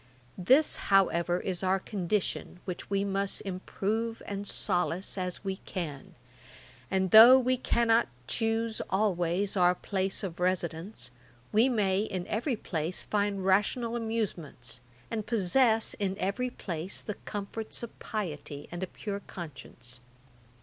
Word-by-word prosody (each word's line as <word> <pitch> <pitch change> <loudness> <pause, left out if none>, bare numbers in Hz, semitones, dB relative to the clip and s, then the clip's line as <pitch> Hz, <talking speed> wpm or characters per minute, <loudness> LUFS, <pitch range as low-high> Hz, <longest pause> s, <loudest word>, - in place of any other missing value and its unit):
'This, 260 - +4
however, 180 -3 +3
is 185 -3 -2
our 190 0 +2
condition, 190 -2 -2
which 180 -2 -6
we 200 0 +1
must 195 0 -1
improve 210 +4 -2
and 200 0 -4
solace 180 0 0
as 180 -1 -3
we 190 -1 -2
can: 160 -9 -6 0.7
and 190 -2 +1
though 235 +4 +11
we 255 0 +2
cannot 235 -2 +2 0.2
choose 225 - -1
always 190 -1 +1
our 180 -1 +4
place 190 +2 -2
of 175 -3 -5
residence, 180 -3 -2 0.4
we 225 +5 +4
may 200 -6 +2
in 190 -4 -3
every 240 +4 0
place 165 -4 -3
find 205 -2 -1
rational 220 +5 +2
amusements, 190 - -3 0.3
and 220 -2 -3
possess 225 +2 +3
in 195 -2 -2
every 210 +6 -1
place 180 -5 -4
the 210 - -3 0.2
comforts 210 +3 -5
of 235 - -8
piety 150 -8 -5
and 175 +1 -5
a 185 - -2
pure 200 +2 -5
conscience. 130 -6 -9
195 Hz, 130 wpm, -30 LUFS, 180-220 Hz, 0.7 s, though